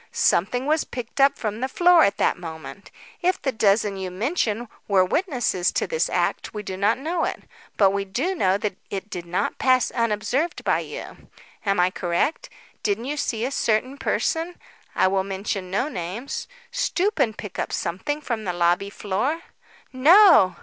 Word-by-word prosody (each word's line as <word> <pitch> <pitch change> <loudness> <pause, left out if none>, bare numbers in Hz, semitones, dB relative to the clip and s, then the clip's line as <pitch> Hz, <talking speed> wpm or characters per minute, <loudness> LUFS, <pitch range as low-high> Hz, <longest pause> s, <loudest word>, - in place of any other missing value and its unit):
"Something 245 +9 +1
was 305 +2 +2
picked 245 +2 -5
up 275 0 +5
from 215 -1 -3
the 260 - -1
floor 350 +2 +5
at 200 - +2
that - - +2
moment. 165 +3 -9 0.3
If 365 +1 +1
the 270 - -1
dozen 205 -2 +2
you 190 -1 -4
mention 230 - -1 0.2
were 190 -2 +4
witnesses 245 - 0
to - - 0
this 480 -1 0
act - - -1
we 210 - -4
do 190 - -5
not 200 +5 +2
know 330 +5 -2
it. - - -3 0.3
But 195 -2 +5
we 200 0 -1
do 255 - -2
know 195 - +2
that 205 -2 -3
it 200 +1 -5
did 175 -1 -6
not 175 +2 -2
pass 255 -1 +3
unobserved 230 +7 -1
by - - +2
you. - - -9 0.4
Am 195 -2 +2
I 180 +1 +4
not - - -20
correct? 175 - -1 0.3
Didn't 210 +3 -1
you 290 +3 -2
see 235 -5 -1
a 265 - -2
certain 255 +1 0
person 330 +4 -1 0.4
I - - +4
will 190 0 +1
mention 195 -1 -4
no 205 +9 0
names 205 - -5 0.2
stoop 420 -5 0
and 225 -6 +1
pick 210 - -7
up - - -2
something 290 - -3
from 235 -6 -3
the 180 -3 -2
lobby 175 +3 +1
floor?" 215 - -2 0.5
"No." 300 - +7
215 Hz, 180 wpm, -24 LUFS, 190-280 Hz, 0.5 s, No